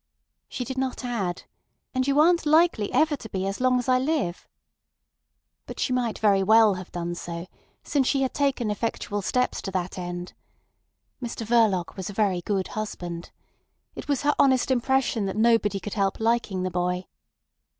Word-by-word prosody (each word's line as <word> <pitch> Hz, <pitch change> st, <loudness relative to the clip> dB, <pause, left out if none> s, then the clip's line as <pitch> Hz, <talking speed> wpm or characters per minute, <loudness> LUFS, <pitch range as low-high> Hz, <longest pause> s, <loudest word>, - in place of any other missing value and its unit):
She 250 Hz, -, -4 dB
did 265 Hz, +1 st, -4 dB
not 260 Hz, -1 st, -3 dB
add: 200 Hz, -8 st, -2 dB, 0.5 s
"And 260 Hz, 0 st, 0 dB
you 280 Hz, +1 st, +3 dB
aren't 335 Hz, 0 st, +4 dB
likely 310 Hz, -9 st, +3 dB
ever 305 Hz, +3 st, +3 dB
to 230 Hz, -5 st, -10 dB
be 190 Hz, -1 st, -2 dB
as 195 Hz, +4 st, -3 dB
long 255 Hz, 0 st, +3 dB
as 245 Hz, -, -3 dB
I 255 Hz, 0 st, +4 dB
live." 265 Hz, -, -1 dB, 1.2 s
But -, -, -8 dB
she 255 Hz, -, 0 dB
might 245 Hz, -3 st, -1 dB
very 200 Hz, -2 st, +3 dB
well 220 Hz, +1 st, +6 dB
have 185 Hz, -1 st, -8 dB
done 175 Hz, 0 st, -3 dB
so, 170 Hz, 0 st, -6 dB, 0.4 s
since 275 Hz, -3 st, +1 dB
she 275 Hz, -1 st, +2 dB
had 260 Hz, -, -1 dB
taken 275 Hz, -6 st, 0 dB
effectual 205 Hz, -1 st, -2 dB
steps 250 Hz, +5 st, 0 dB
to -, -, -5 dB
that 185 Hz, -1 st, -3 dB
end. 175 Hz, 0 st, -5 dB, 0.9 s
Mr 235 Hz, -1 st, -5 dB
Verloc 215 Hz, -6 st, +2 dB
was 190 Hz, +2 st, -4 dB
a -, -, -6 dB
very 195 Hz, -4 st, +1 dB
good 195 Hz, 0 st, -2 dB
husband. 175 Hz, -5 st, -5 dB, 0.6 s
It -, -, -8 dB
was 285 Hz, -1 st, 0 dB
her 295 Hz, 0 st, +3 dB
honest 265 Hz, -1 st, +4 dB
impression 250 Hz, -4 st, +1 dB
that 195 Hz, -, -4 dB
nobody 220 Hz, -3 st, +3 dB
could 210 Hz, -, -6 dB
help 195 Hz, -2 st, 0 dB
liking 225 Hz, -5 st, 0 dB
the 185 Hz, -, -2 dB
boy. 180 Hz, +1 st, -1 dB
220 Hz, 175 wpm, -25 LUFS, 190-260 Hz, 1.2 s, well